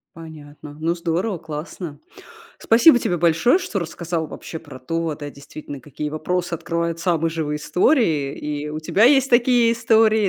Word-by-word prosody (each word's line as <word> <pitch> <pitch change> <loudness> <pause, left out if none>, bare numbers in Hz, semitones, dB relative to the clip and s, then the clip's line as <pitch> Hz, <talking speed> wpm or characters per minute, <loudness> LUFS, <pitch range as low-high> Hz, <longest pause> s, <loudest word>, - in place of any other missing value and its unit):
Понятно. 150 -2 -11
Ну, 165 +2 0
здорово, 175 +3 -2
классно. 155 0 -7 0.6
Спасибо 245 +5 +6
тебе 180 -6 -1
большое, 170 - +3
что 290 - -3
рассказал 170 -1 -3
вообще 160 - -8
про 145 -5 -12
то, 165 +4 -3
да, 145 -1 -8
действительно, 140 0 -10
какие 150 +3 -6
вопросы 175 +3 -2
открывают 170 0 -2
самые 165 -2 0
живые 155 -2 -2
истории. 160 - +1
И 150 0 -4
у 150 +1 -5
тебя 190 +7 +2
есть 270 +1 +4
такие 240 -1 +4
истории, 220 -2 +3
165 Hz, 150 wpm, -21 LUFS, 150-205 Hz, 0.6 s, Спасибо